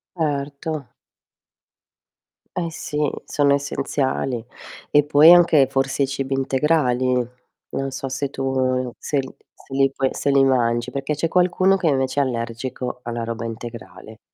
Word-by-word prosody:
Erto. 145 -2 -3 1.7
Eh 170 -2 -2
sì, 150 - -6 0.3
sono 140 -1 +2
essenziali 135 -3 -1 0.5
e 145 0 +4
poi 150 +3 +7
anche, 165 -6 +5
forse, 135 +1 0
i - - 0
cibi 135 0 -3
integrali. 135 -1 +1 0.6
Non 135 0 -3
so 135 - -5
se 135 +1 -2
tu, 135 - -7
uhm, 130 -1 0
se 145 - -2
l 130 - -6 0.2
se - - -13
li 135 0 +3
poi 135 -1 0
se - - -1
li 140 0 +5
mangi, 120 -3 +1
perché 140 +2 -2
c'è 155 +3 -1
qualcuno 185 +2 +3
che 175 - -1
invece 135 -1 +1
è - - +3
allergico 125 0 -4
alla 120 0 -4
roba 115 0 -4
integrale. 110 -3 -9
135 Hz, 145 wpm, -22 LUFS, 125-145 Hz, 1.7 s, poi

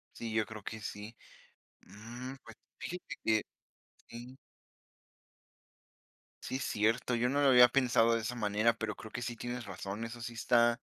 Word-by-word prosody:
Sí, 115 -1 -5
yo 110 -1 +2
creo 110 0 -9
que 110 +1 -6
sí. 105 +2 -7 0.7
Mm, 120 +5 -8
pues, 115 - -12 0.2
fíjate 180 +1 -6
que 110 -1 +3 0.7
sí. 120 +2 -9 2.1
Sí, 130 - -2
cierto, 115 +1 +1
yo 120 +1 +1
no 140 +2 +1
lo 140 - +5
había 125 -1 +9
pensado 115 -3 +4
de 115 - 0
esa 115 +3 -3
manera, 110 0 +2
pero 110 -2 -3
creo 110 - -10
que - - -4
sí 120 0 -3
tienes 120 +1 -5
razón, 100 +3 -5
eso 120 +1 -8
sí 120 0 -5
está 120 0 +3
115 Hz, 160 wpm, -33 LUFS, 110-125 Hz, 2.1 s, había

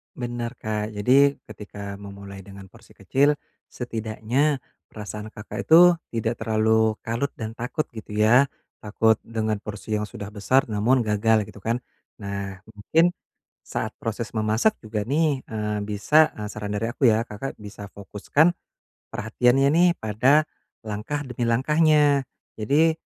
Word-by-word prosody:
Benar 120 -1 -4
Kak, 110 0 -3
jadi 135 +7 +4 0.2
ketika 100 -1 -8
memulai 100 -1 -10
dengan 100 -1 -12
porsi - - -19
kecil, 145 +2 +2 0.3
setidaknya 120 +4 -1 0.2
perasaan 105 0 -8
Kakak 105 - -7
itu 175 +2 +7 0.2
tidak 115 0 -1
terlalu 110 0 +2
kalut 115 +5 -2
dan 110 0 -7
takut 125 +6 -3
gitu 110 -2 -10
ya, 120 +6 +6 0.3
takut 110 +1 +2
dengan 110 -2 -1
porsi 105 +1 -4
yang 105 - -2
sudah 100 0 -8
besar 115 +6 +1
namun 115 +5 +2
gagal 110 -1 +1
gitu 105 - -13
kan. 115 +5 -2 0.4
Nah, 100 -1 -5
mungkin 155 +11 +2 0.5
saat - - -4
proses 115 0 -4
memasak 110 - +2
juga 105 -2 -4
nih, 145 0 0
eee, 105 -1 -3
bisa 130 +10 +3
eee, 105 -1 -6
saran 105 -1 -5
dari 115 +3 -1
aku 130 +2 0
ya, 110 -1 +5
Kakak 115 +3 -6
bisa 105 0 -9
fokuskan 105 - +1 0.6
perhatiannya 125 +5 +2
nih 175 +3 +5
pada 125 +8 +3 0.4
langkah 110 +8 -4
demi 120 -2 -3
langkahnya. 145 +2 +3 0.3
Jadi, 150 +9 +3
110 Hz, 140 wpm, -24 LUFS, 105-130 Hz, 0.6 s, itu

